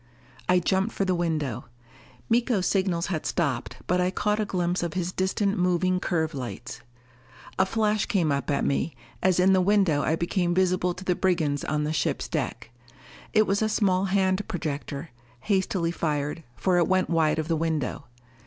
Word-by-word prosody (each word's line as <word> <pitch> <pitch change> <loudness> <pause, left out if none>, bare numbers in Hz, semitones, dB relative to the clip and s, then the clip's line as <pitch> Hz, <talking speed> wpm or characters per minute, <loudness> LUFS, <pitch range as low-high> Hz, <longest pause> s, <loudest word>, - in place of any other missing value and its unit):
I 180 - +5
jumped 190 +4 +1
for 195 - 0
the 185 - +1
window. 155 -8 -1 0.6
Miko's 230 -4 +2
signals 185 -4 +1
had 155 - -2
stopped, 145 -9 -2
but 180 +1 +1
I 180 - +2
caught 210 +3 0
a 215 - +1
glimpse 180 -2 -1
of 170 -1 -3
his 180 -1 -1
distant 195 +2 0
moving 180 +1 +2
curve 160 -3 -1
lights. 125 -3 -6 0.8
A 190 - +4
flash 215 0 +1
came 170 -7 +1
up 140 +1 -1
at 140 -1 +1
me, 140 +1 0 0.3
as 185 -1 +3
in 190 +1 +5
the 190 - +4
window 190 -6 +3
I 160 - +1
became 175 +1 0
visible 180 -1 +1
to 185 - -9
the 180 - +2
brigands 165 -6 0
on 150 -1 -1
the 150 +1 -1
ship's - - -1
deck. - - -3 0.6
It 215 -1 +4
was 200 +1 0
a 220 - +2
small 195 -3 +2
hand 190 0 +1
projector, 150 -1 -4 0.3
hastily 190 -4 0
fired, 150 -1 -2
for 180 -2 +2
it 170 - +3
went 185 0 +2
wide 160 -2 +2
of 155 -1 -2
the 165 - +1
window. 160 -4 -2
180 Hz, 180 wpm, -26 LUFS, 160-190 Hz, 0.8 s, I